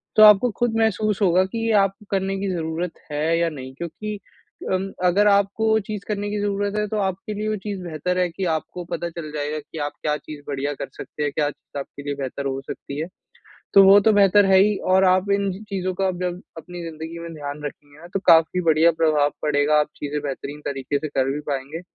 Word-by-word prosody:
तो 215 - +8
आपको 210 +3 +8
खुद 240 -2 +1
महसूस 215 -1 +1
होगा 185 -1 +4
कि 210 +5 -5
ये 225 - +2
आपको 195 +2 -2
करने 195 0 0
की 195 0 -2
ज़रूरत 165 0 -3 0.2
है, 155 +3 +1
या 170 0 +2
नहीं 130 -4 -8
क्योंकि 205 +7 -6 0.5
उम, 190 +1 -1
अगर 200 +4 +4
आप 200 -1 +5
को 220 0 0
वो 220 0 +4
चीज़ 210 -2 -4
करने 205 -1 -2
की 210 0 -2
ज़रूरत 205 0 -1
है, 210 0 0
तो 215 - -3
आपके 195 +1 -2
लिए 210 +1 -3
वो 215 - 0
चीज़ 200 -3 -4
बेहतर 175 +2 -2
है 180 -1 +2
कि 185 +3 -4
आपको 160 +3 -6
पता 170 - -2
चल 165 -2 -7
जाएगा 150 0 -3
कि 150 +2 -12
आप 145 0 -2
क्या 150 -1 0
चीज़ 150 -1 -10
बढ़िया 145 +1 -2
कर - - -6
सकते 150 - -6
हैं, 145 - 0
क्या 150 -2 +1
चीज़ 145 - -9
आपके 140 +1 -8
लिए 145 0 -3
बेहतर 140 0 -5
हो 135 0 -2
सकती 140 +1 -6
है। 160 - -2 0.7
तो 195 - +9
वो 195 +1 +8
तो 220 - +4
बेहतर 205 0 +5
है 190 0 +5
ही 205 +2 +4 0.2
और 190 0 +5
आप 185 +2 +3
इन 200 -1 +1 0.2
चीज़ों 185 -2 -2
का 190 0 +1
जब, 180 0 -4 0.2
अपनी 175 +2 -8
ज़िंदगी 165 0 -7
में 170 0 -7
ध्यान 145 -1 -6
रखेंगे 145 0 -9
ना, 170 - -11
तो 195 - +1
काफ़ी 165 +2 +5
बढ़िया 165 0 +4
प्रभाव 155 -3 +2
पड़ेगा, 150 0 +3
आप 150 - +1
चीज़ें 150 0 -3
बेहतरीन 145 +1 -5
तरीके 140 0 -2
से 155 - -4
कर 135 -2 0
भी 145 - -3
पाएँगे। 140 +4 -3
170 Hz, 230 wpm, -23 LUFS, 150-195 Hz, 0.7 s, तो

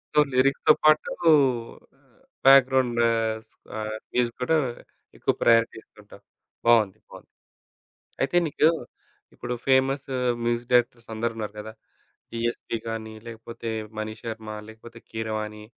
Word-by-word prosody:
So 150 - +7
లిరిక్స్‌తో 135 +4 +4
పాటూ 155 0 +4 0.9
ఆహ్, - - -30 0.3
background 130 -3 +5 0.5
స్ - - -25 0.2
ఆహ్, 110 0 -4 0.2
మ్యూజిక్‌ 120 -1 0
కూడా 160 +6 +2 0.6
ఎక్కువ - - +1
ప్రయారిటీ 115 0 +4
ఇస్తుంటావు. - - -18 0.4
బావుంది. 110 -5 +4
బావుంది. - - -14 0.9
అయితే 135 +6 +1
నీకు 150 +1 +3 0.7
ఇప్పుడు 120 0 -5
ఫేమసు 135 0 +2 0.3
మ్యూజిక్ 120 0 -1
డైరెక్టర్స్ 120 -1 +2
అందరున్నారు 110 -2 -3
గదా! 110 +1 -8 0.6
'డీఎస్‌పీ' 115 0 -3
గానీ 110 -1 -5
లేకపోతే 115 0 -8 0.3
'మణిశర్మ' 110 0 -6 0.2
లేకపోతే 115 +1 -13
'కీరవాణి' 110 -1 -4
115 Hz, 105 wpm, -25 LUFS, 110-130 Hz, 0.9 s, So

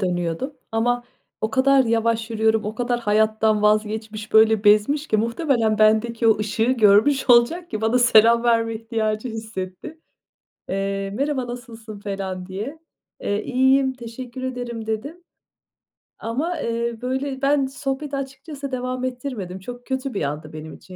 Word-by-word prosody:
dönüyordum 175 - -2 0.2
ama 240 +2 +1 0.4
o 220 - -1
kadar 270 +2 +4
yavaş 230 0 0
yürüyorum, 220 -1 +1
o 215 +1 -4
kadar 245 0 -1
hayattan 215 0 +2
vazgeçmiş, 215 0 0
böyle 220 -1 +5
bezmiş 215 +9 +4
ki 215 - +2
muhtemelen 230 -1 +1
bendeki 220 +2 +3
o 220 - +4
ışığı 215 +1 -1
görmüş 235 +4 +4
olacak 285 +9 +4
ki 215 - -3
bana 220 +3 +2
selam 235 -1 +5
verme 230 -1 +2
ihtiyacı 220 +1 -2
hissetti. 220 +5 -7 0.7
Eee, 195 0 -2
"Merhaba, 275 +1 -1
nasılsın?" 230 -3 -9
falan 195 -2 -5
diye. 210 +11 -6 0.4
Eee, 205 +1 -1
"İyiyim, 265 +1 +3
teşekkür 250 +1 -8
ederim." 245 -3 -5
dedim. 275 +11 -4 1.0
Ama, 300 +10 -2
eee, 230 0 -2
böyle 265 +1 -3
ben 280 0 +3
sohbeti 270 +2 -4
açıkçası 275 +1 -7
devam 255 0 -3
ettirmedim. 245 -8 -5
Çok 245 +5 -9
kötü 265 0 -3
bir 195 - -2
andı 150 +2 -4
benim 155 0 -8
için 185 - -13
230 Hz, 140 wpm, -22 LUFS, 215-260 Hz, 1.0 s, böyle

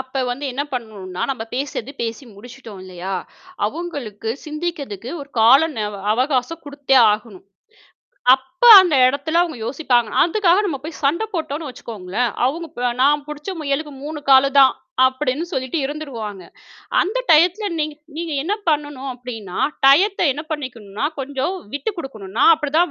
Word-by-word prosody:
அப்ப 265 0 -3
வந்து 260 +4 -4
என்ன 275 +3 -2
பண்ணனும்னா, 205 -7 -5
நாம 250 -4 -4
பேசுறது 265 -2 -4
பேசி 230 +3 -4
முடிச்சிட்டோம் 230 -1 -12
இல்லையா? 185 +1 -6 0.5
அவுங்களுக்கு 245 - -6 0.2
சிந்திக்கறதுக்கு 300 - -5
ஒரு 280 - -9
கால 240 +5 +7 0.2
ந - - -2 0.3
அவகாசம் 260 +6 -1
குடுத்தே 285 -2 +1 0.2
ஆகணும். 210 -3 -7 0.9
அப்போ 265 - -2
அந்த 355 -5 +1
எடத்துல 285 +5 0
அவுங்க 335 -6 -4
யோசிப்பாங்க. 250 -5 +1
அதுக்காக 355 +1 +3
நம்ம 290 -8 -3
போய்ச் 310 +1 -9
சண்டை 315 +10 +2
போட்டோம்ன்னு 315 -2 -3
வச்சுக்கோங்களேன், 230 -2 -4
அவுங்க 330 +6 -1
ப்ப, 245 -4 -1
"நான் 290 +1 +3
புடிச்ச 300 +5 -6
முயலுக்கு 295 0 -2
3 300 0 -6
காலுதான்" 275 0 +6 0.3
அப்படின்னு 260 +4 -1
சொல்லிட்டு 260 +4 -2
இருந்துருவாங்க. 245 -10 -6 0.6
அந்த 420 +7 -2
டயத்துல 360 +7 +4
நீங்க 305 -1 -2 0.2
நீங்க 330 -1 -4
என்ன 375 +7 -1 0.2
பண்ணணும் 290 -3 -2
அப்படின்னா? 225 -7 -8 0.3
டயத்தை 360 +8 +5
என்ன 295 - -6
பண்ணிக்கணும்னா, 250 -7 -4
கொஞ்சம் 275 +6 -2 0.2
விட்டுக்குடுக்கணும், 270 - -6
நா - - +5
அப்படித்தான் 315 +3 +1
275 Hz, 135 wpm, -20 LUFS, 245-310 Hz, 0.9 s, கால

